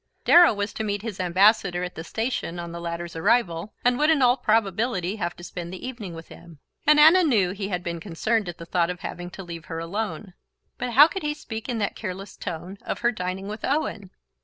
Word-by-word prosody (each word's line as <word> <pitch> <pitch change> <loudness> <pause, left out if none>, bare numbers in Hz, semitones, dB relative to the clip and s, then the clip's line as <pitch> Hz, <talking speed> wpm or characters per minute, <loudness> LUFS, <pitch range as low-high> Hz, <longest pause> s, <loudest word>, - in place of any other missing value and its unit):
Darrow 345 0 +8
was 205 0 -3
to 220 - -3
meet 205 -1 -2
his 220 -5 -5
Ambassador 185 0 +3
at 180 - -4
the 160 - -7
station 220 -3 -3
on 170 -1 -6
the 170 0 -7
latter's 170 0 -5
arrival, 195 -1 +1
and 245 0 +3
would 300 +1 +3
in 305 -5 +4
all 245 0 +5
probability 215 -4 0
have 175 -3 -3
to 175 - -13
spend 175 -1 -6
the 185 +7 -7
evening 215 -9 -7
with 165 0 -10
him, 170 -3 -13 0.3
and 300 0 +7
Anna 320 +5 +8
knew 215 - +3
he 195 +1 -4
had 180 -3 -3
been 170 -1 -4
concerned 205 +4 -1
at 175 - -7
the 170 - -9
thought 170 0 +1
of 180 -1 -5
having 175 0 -6
to 195 +2 -9
leave 170 -2 -8
her 165 - -6
alone. 195 +3 -4 0.5
But 245 -1 -3
how 290 +5 +9
could 385 +3 -5
he 300 0 -2
speak 225 -6 -7
in 240 - -1
that 205 -2 -1
careless 195 -1 -6
tone 180 +2 -6
of - - -5
her 240 0 +3
dining 185 -2 -4
with 215 +2 -7
Owen? 220 -9 -1
195 Hz, 230 wpm, -25 LUFS, 175-230 Hz, 0.5 s, how